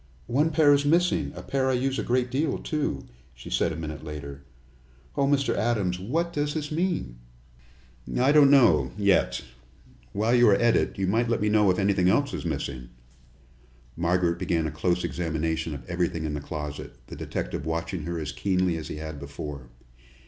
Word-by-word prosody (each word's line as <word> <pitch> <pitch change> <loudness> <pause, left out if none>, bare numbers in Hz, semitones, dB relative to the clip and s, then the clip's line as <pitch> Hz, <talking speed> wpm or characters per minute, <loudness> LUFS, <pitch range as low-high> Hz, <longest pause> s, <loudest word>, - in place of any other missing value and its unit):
"One 145 +6 +2
pair 150 -2 +5
is 140 0 +3
missing 170 +5 +2
a - - -8
pair 130 -1 0
I - - +2
use 130 +2 0
a - - -1
great 125 0 0
deal, 140 +2 0
too," 150 -2 -3 0.3
she - - -11
said - - +1
a - - -4
minute 80 -1 -6
later. 70 -2 -7 0.7
"Oh, 140 - +2
Mr. 140 -1 +2
Adams, 100 -6 0
what 165 - -1
does 145 0 -1
this 150 -1 -3
mean?" 160 - -2 1.0
"I 130 +3 +4
don't 145 -2 +7
know 135 -4 +5
yet. 100 -2 +2 0.7
While 110 - +1
you 120 -2 +6
are 100 - +6
at 120 +3 +3
it, - - 0
you 95 - 0
might 115 +5 +1
let 115 - +1
me 105 - +1
know 105 -2 +4
if 90 - +2
anything 95 -2 +2
else 140 +8 +2
is - - -4
missing." 70 -5 -4 1.1
Margaret 85 0 +1
began 85 -3 0
a 80 - -2
close 90 +3 0
examination 80 -1 -2
of 65 -4 -10
everything 85 -2 -1
in 75 - -2
the 75 - -4
closet, 75 0 -6
the - - -9
detective 75 - -4
watching 85 +2 -2
her 85 0 -3
as 75 -3 -4
keenly 90 -3 0
as 80 - -6
he - - -6
had 80 -1 -6
before. 70 -2 -7
95 Hz, 185 wpm, -26 LUFS, 80-130 Hz, 1.1 s, don't